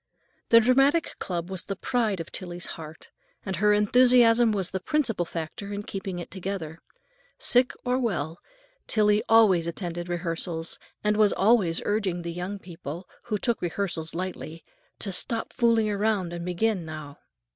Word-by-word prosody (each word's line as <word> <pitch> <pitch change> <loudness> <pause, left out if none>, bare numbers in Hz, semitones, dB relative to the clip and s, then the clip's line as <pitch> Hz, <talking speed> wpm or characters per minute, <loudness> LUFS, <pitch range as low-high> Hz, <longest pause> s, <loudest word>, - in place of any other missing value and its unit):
The 230 - +8
dramatic 270 +7 +3
club 175 0 -4
was 185 -2 -4
the 195 - -3
pride 215 -1 0
of 165 - -6
Tillie's 175 -1 -6
heart, 160 -1 -11 0.3
and 190 -4 -3
her 210 +2 +4
enthusiasm 235 +2 +5
was 195 -4 -1
the 190 - -2
principal 225 - 0
factor 170 +5 -6
in 205 0 -4
keeping 195 -2 -5
it 175 - -7
together. 185 -4 -5 0.6
Sick 250 +1 +4
or 250 +1 +1
well, 170 - -2 0.5
Tillie 210 -1 +3
always 205 -7 +5
attended 175 0 -4
rehearsals, 165 -1 -2 0.2
and 210 0 +2
was 215 -1 +5
always 195 -5 +3
urging 195 -5 -1
the 170 0 -4
young 180 +4 -4
people, 175 -2 -8 0.2
who 215 -3 -1
took 235 +2 0
rehearsals 170 -2 -3
lightly, 170 -2 -5 0.3
to 200 - -4
"stop 225 +5 -1
fooling 230 -2 +3 0.4
and 170 0 -5
begin 185 +1 0
now." 155 -3 -8
190 Hz, 150 wpm, -26 LUFS, 170-220 Hz, 0.6 s, The